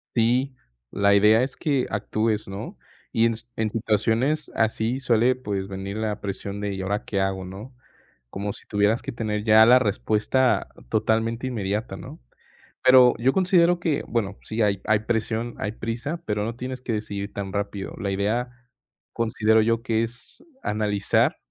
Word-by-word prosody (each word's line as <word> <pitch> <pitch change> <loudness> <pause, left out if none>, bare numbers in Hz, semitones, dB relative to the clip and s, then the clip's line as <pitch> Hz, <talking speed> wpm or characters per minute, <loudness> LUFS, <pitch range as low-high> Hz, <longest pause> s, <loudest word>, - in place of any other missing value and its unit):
Sí, 125 +3 +2 0.4
la 100 0 +3
idea 105 +3 +5
es 130 0 -4
que 140 -5 0
actúes, 110 +1 -1
¿no?, 95 +1 -7 0.3
y 115 - +3
en 115 - +2
s 115 +2 -9
en 110 -1 0
situaciones 115 +7 0
así 110 +3 0
suele, 125 0 +3
pues, 100 -6 -4
venir 95 +1 -5
la 110 -1 -2
presión 100 0 -5
de: 100 -1 -2
"Y 95 - -4
ahora, 100 +2 -2
¿qué 100 - -2
hago?", 95 -1 -1
¿no?, 105 +8 -9 0.6
como 100 +7 -4
si - - -15
tuvieras 105 +2 +2
que - - -5
tener 105 -2 -3
ya 110 0 +7
la 125 +2 +7
respuesta 110 +3 +1 0.2
totalmente 115 - 0
inmediata, 105 -1 -3
¿no?, - - -10 0.6
pero 130 -1 +7
yo 130 +4 +3
considero 175 -2 +3
que 155 -4 0
bueno, 105 -4 -1
sí 110 +1 -2
hay 100 -2 +1
hay 110 -1 +2
presión, 115 +1 -2
hay 105 - -3
prisa, 120 +9 -4
pero 105 -1 -1
no 115 - -3
tienes 130 +1 -5
que 120 - -3
decidir 100 -2 -4
tan 100 -1 -5
rápido. 100 -1 -4
La 100 -1 -2
idea, 110 +6 -1 0.6
considero 110 -1 +2
yo 115 +1 +1
que 115 -1 +1
es 120 +2 -11 0.2
analizar 105 -1 +1
110 Hz, 165 wpm, -24 LUFS, 105-120 Hz, 0.6 s, ya